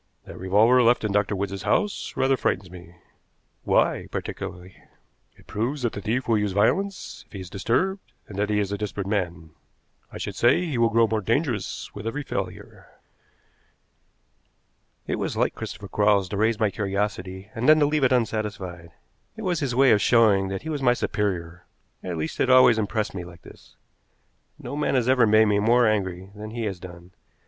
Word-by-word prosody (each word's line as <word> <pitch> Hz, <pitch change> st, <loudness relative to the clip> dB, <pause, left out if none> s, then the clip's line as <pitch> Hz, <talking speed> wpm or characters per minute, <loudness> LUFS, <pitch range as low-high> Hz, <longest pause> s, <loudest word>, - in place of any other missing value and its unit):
That -, -, -10 dB
revolver 110 Hz, +7 st, +4 dB
left 120 Hz, 0 st, +3 dB
in 105 Hz, -, -1 dB
Dr. 100 Hz, 0 st, +1 dB
Wood's 100 Hz, 0 st, -3 dB
house 205 Hz, -1 st, -1 dB
rather 135 Hz, 0 st, +3 dB
frightens 95 Hz, -6 st, -2 dB
me." 90 Hz, -1 st, -12 dB, 0.7 s
"Why, -, -, +2 dB
particularly?" 90 Hz, 0 st, -6 dB, 0.6 s
"It -, -, -20 dB
proves 125 Hz, +6 st, -3 dB
that 120 Hz, -, 0 dB
the 100 Hz, -, -6 dB
thief 115 Hz, +5 st, -2 dB
will 115 Hz, -2 st, +3 dB
use 105 Hz, -2 st, -1 dB
violence 190 Hz, -, 0 dB
if -, -, -25 dB
he 100 Hz, -, -6 dB
is 90 Hz, -1 st, -9 dB
disturbed, 185 Hz, -, 0 dB, 0.3 s
and 100 Hz, -, -10 dB
that 105 Hz, 0 st, 0 dB
he 105 Hz, -, +1 dB
is 100 Hz, -1 st, -1 dB
a 100 Hz, -, -3 dB
desperate 105 Hz, -2 st, -4 dB
man. 85 Hz, -6 st, -3 dB, 0.6 s
I -, -, -8 dB
should 100 Hz, -, -5 dB
say 120 Hz, -, +3 dB
he 145 Hz, -8 st, -2 dB
will 115 Hz, 0 st, +4 dB
grow 115 Hz, 0 st, +4 dB
more 110 Hz, 0 st, -1 dB
dangerous 115 Hz, -, -2 dB
with 105 Hz, +2 st, -7 dB
every 145 Hz, +6 st, -3 dB
failure." -, -, -6 dB, 2.2 s
It -, -, -2 dB
was -, -, -3 dB
like -, -, +1 dB
Christopher 100 Hz, -, -7 dB
Quarles 100 Hz, -1 st, +2 dB
to 100 Hz, -, -4 dB
raise 110 Hz, +1 st, +1 dB
my 110 Hz, -2 st, +2 dB
curiosity, 100 Hz, -1 st, -3 dB
and 125 Hz, +3 st, 0 dB
then 155 Hz, -, +8 dB
to 150 Hz, -, +4 dB
leave 150 Hz, 0 st, 0 dB
it 130 Hz, -, +4 dB
unsatisfied. 105 Hz, -7 st, -2 dB, 0.5 s
It 220 Hz, -, -7 dB
was 180 Hz, -4 st, 0 dB
his 135 Hz, -6 st, -2 dB
way 135 Hz, 0 st, +5 dB
of 105 Hz, -2 st, +4 dB
showing 105 Hz, -5 st, +4 dB
that 95 Hz, +4 st, -5 dB
he 160 Hz, -, -5 dB
was 150 Hz, -3 st, -3 dB
my 125 Hz, -2 st, +4 dB
superior 90 Hz, -6 st, -3 dB, 0.4 s
at 90 Hz, -2 st, -4 dB
least, 80 Hz, 0 st, -4 dB
it 130 Hz, -, +2 dB
always 130 Hz, -3 st, +6 dB
impressed 105 Hz, 0 st, -2 dB
me 90 Hz, -2 st, -5 dB
like 90 Hz, 0 st, -13 dB
this. -, -, -16 dB, 0.8 s
No -, -, -7 dB
man 150 Hz, -2 st, 0 dB
has 125 Hz, -2 st, +1 dB
ever 130 Hz, -3 st, +4 dB
made 110 Hz, +1 st, +5 dB
me 105 Hz, -1 st, +2 dB
more 120 Hz, +3 st, +4 dB
angry 95 Hz, -3 st, -1 dB
than 105 Hz, +1 st, -8 dB
he 115 Hz, +1 st, -5 dB
has 100 Hz, -4 st, -3 dB
done. 85 Hz, 0 st, -12 dB
105 Hz, 190 wpm, -24 LUFS, 95-125 Hz, 2.2 s, then